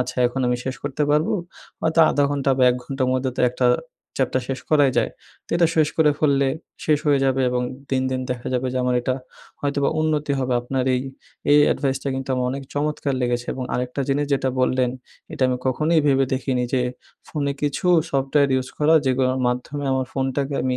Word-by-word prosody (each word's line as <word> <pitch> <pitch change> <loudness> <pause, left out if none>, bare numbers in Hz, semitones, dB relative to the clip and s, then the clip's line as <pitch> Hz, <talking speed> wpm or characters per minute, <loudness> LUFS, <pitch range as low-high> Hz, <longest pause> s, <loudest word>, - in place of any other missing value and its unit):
আচ্ছা 125 0 -3
এখন 125 +2 -3
আমি 125 - +1
শেষ 130 0 -2
করতে 145 +1 -2
পারবো 150 +2 +2 0.5
হয়তো 165 0 +2
১/২ 145 - +2
ঘন্টা 140 -1 0
বা - - +3
১ 125 - -1
ঘন্টার 135 0 -2
মধ্যে 130 0 0
তো - - +2
একটা 125 0 0 0.5
চ্যাপটা 130 -1 +1
শেষ 130 -1 -3
করাই 145 -3 +5
যায়। - - +2 0.4
তো - - -17
এটা 170 -1 +4
শেষ 155 -2 +4
করে 155 -2 +5
ফেললে 140 -3 +3 0.4
শেষ 150 -2 +3
হয়ে 145 -1 +4
যাবে 135 0 +1
এবং 125 0 0 0.3
দিন, 130 -1 +1
দিন 130 0 -1
দেখা 120 -1 -4
যাবে 125 +1 0
যে - - -3
আমার 125 0 +1
এটা 130 +1 -1 0.5
হয়তোবা 140 -1 0
উন্নতি 150 -2 0
হবে 130 -1 -1
আপনার 130 +1 -2
এই, 125 - 0 0.5
এই 145 - +7
অ্যাডভাইসটা 135 0 0
কিন্তু 135 0 -5
আমার 125 0 0
অনেক 135 +1 -4
চমৎকার 145 -1 -1
লেগেছে 120 0 -1
এবং 130 - -4
আরেকটা 125 +2 -2
জিনিস 145 +1 +1
যেটা 135 -1 0
বললেন। 130 -1 +2 0.4
এটা - - -3
আমি 125 - 0
কখনোই 155 +6 +2
ভেবে 135 -1 +4
দেখিনি 130 -1 -1
যে 125 - +2 0.5
ফোনে 140 -2 -1
কিছু 145 +5 -1 0.2
সফটওয়্যার 140 +1 +2
ইউজ 130 -1 -1
করা 155 +2 +4
যেগুলার 130 0 +1
মাধ্যমে 140 +4 -3
আমার 130 -1 0
ফোনটাকে 135 +1 -1
আমি 130 -1 0
135 Hz, 195 wpm, -22 LUFS, 130-145 Hz, 0.5 s, এই